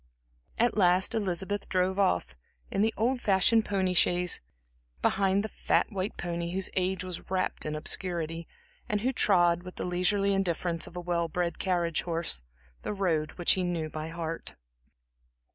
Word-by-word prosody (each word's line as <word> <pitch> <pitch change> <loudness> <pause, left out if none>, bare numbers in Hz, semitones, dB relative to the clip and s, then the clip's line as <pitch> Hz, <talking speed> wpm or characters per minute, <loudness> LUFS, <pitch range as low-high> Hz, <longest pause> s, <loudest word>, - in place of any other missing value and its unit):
At 240 +1 +2
last 185 -2 +4
Elizabeth 200 -1 -1
drove 185 +1 +1
off, 90 - +1 0.4
in 195 - 0
the 220 +1 +3
old 245 +3 +1
fashioned 215 +3 +3
pony 190 -2 0
chaise, 180 0 +3 0.6
behind 195 0 +2
the - - -2
fat 220 - +1
white 195 0 -3
pony 170 0 -3
whose 190 0 0
age 185 0 0
was 180 -2 -6
wrapped 185 -4 -1
in 155 - -2
obscurity, 165 0 -2 0.4
and 210 -1 0
who 260 +4 0
trod, 175 -7 +3
with 180 0 -10
the - - -4
leisurely 195 +3 +2
indifference 175 -3 0
of - - -12
a - - -3
well 170 -1 0
bred 170 +1 -2
carriage 175 -4 +1
horse, 165 - -2 0.4
the - - -3
road 165 -6 0
which 175 - +2
he 185 - +2
knew 170 -3 -2
by 155 0 -5
heart. 165 0 -5
180 Hz, 160 wpm, -29 LUFS, 170-195 Hz, 0.6 s, last